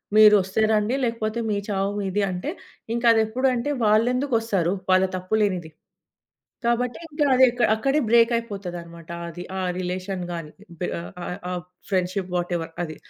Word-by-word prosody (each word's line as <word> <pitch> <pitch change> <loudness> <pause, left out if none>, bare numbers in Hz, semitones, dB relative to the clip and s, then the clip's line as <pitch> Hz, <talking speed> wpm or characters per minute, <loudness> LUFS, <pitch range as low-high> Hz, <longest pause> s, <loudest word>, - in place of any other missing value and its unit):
మీరోస్తే 210 -2 +6
రండి, 215 +4 +2
లేకపోతే 230 -1 -2
మీ 205 - +1
చావు 195 -1 0
మీది 200 +1 -1
అంటే, 180 +11 -4 0.5
ఇంకా 235 - -2
అది 220 - +4
ఎప్పుడేంటే 255 +2 0 0.2
వాలేందుకొస్తారు? 225 -5 +2 0.2
వాళ్ళ 185 0 +5
తప్పు 185 +4 -2
లేనిది. 185 -6 0 1.0
కాబట్టి 240 +3 0
ఇంకా 295 0 0
అది 260 0 +7 0.3
అక్కడే 275 +6 +1
బ్రేకైపోతదన్నమాట 195 -8 0 0.2
అది, 175 +2 -7 0.2
ఆ - - -1 0.2
రిలేషన్ 185 +1 -3
గాని, 165 -3 -5 0.3
బే 180 - -1 0.4
ఆహ్, 180 - -5
ఆహ్, 175 -1 -3 0.3
ఫ్రెండ్‌షిప్ 185 0 -1
వాటెవర్ 175 -2 -2
అది. 155 -2 -6
205 Hz, 135 wpm, -24 LUFS, 180-235 Hz, 1.0 s, అది